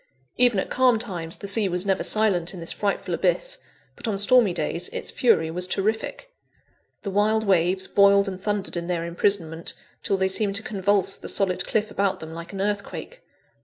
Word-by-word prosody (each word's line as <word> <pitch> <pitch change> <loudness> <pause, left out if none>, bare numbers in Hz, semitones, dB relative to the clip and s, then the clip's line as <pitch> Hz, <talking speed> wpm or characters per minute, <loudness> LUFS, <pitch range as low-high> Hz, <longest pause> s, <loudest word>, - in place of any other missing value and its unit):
Even 245 -5 +4
at - - -4
calm 255 -2 +4
times 175 -8 -1
the 200 - -7
sea 200 0 +2
was 180 +1 -1
never 195 -1 +1
silent 195 -5 +1
in - - -8
this 165 - -3
frightful 205 -1 -2
abyss, - - 0 0.4
but - - -7
on 210 -3 -1
stormy 215 +1 +4
days 170 +1 -2
its - - -3
fury 165 -10 +2
was 180 +2 -2
terrific. 220 - -2 0.7
The 200 - -3
wild 215 +2 +2
waves 185 -1 +2
boiled 200 0 +4
and 185 -1 -5
thundered 205 -2 -2
in 170 0 -3
their 170 -2 -2
imprisonment, 170 -2 -1 0.3
till 200 -3 0
they 190 0 +2
seemed 195 +1 0
to 220 - -3
convulse 195 -2 0
the - - -8
solid 185 -2 0
cliff 215 -1 0
about 200 -1 0
them, 160 0 -8
like 170 +1 -8
an 195 -1 -5
earthquake. 205 - -4
195 Hz, 190 wpm, -24 LUFS, 180-215 Hz, 0.7 s, Even